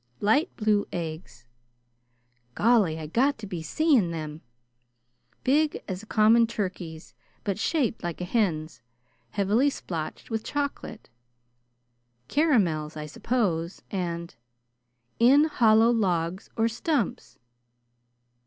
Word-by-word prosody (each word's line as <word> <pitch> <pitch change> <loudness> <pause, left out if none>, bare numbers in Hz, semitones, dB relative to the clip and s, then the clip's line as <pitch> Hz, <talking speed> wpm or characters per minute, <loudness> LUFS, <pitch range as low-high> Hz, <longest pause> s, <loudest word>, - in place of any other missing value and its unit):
"'Light 250 - +2
blue 210 -2 +1
eggs' 160 -5 -6 0.6
" 120 -1 -45 0.3
"Golly! 210 -8 +3
I 160 - -6
got 260 - +1
to 225 - -8
be 180 -4 -5
seeing 255 - +2
them!" 155 -1 -6 0.5
"' 120 0 -44
big 295 +3 +1
as 185 -1 -4
a 220 - -15
common 225 +2 +5
turkey's, 180 -7 -5 0.3
but 200 -1 -2
shaped 260 -3 0
like 175 -2 -4
a 180 - -3
hen's, 165 - -1 0.5
heavily 210 - +2
splotched 165 - -6
with 220 0 -2
chocolate 285 - -4 0.6
'" 120 0 -47
"Caramels, 180 - +1
I 150 - -5
suppose. 170 - -2
And 170 -3 -3 0.3
" 120 0 -51
"' 120 - -45
in 290 +2 +6
hollow 230 -6 +4
logs 185 -4 -1
or 225 0 +3
stumps.'" 235 - -2
190 Hz, 125 wpm, -26 LUFS, 155-230 Hz, 0.6 s, in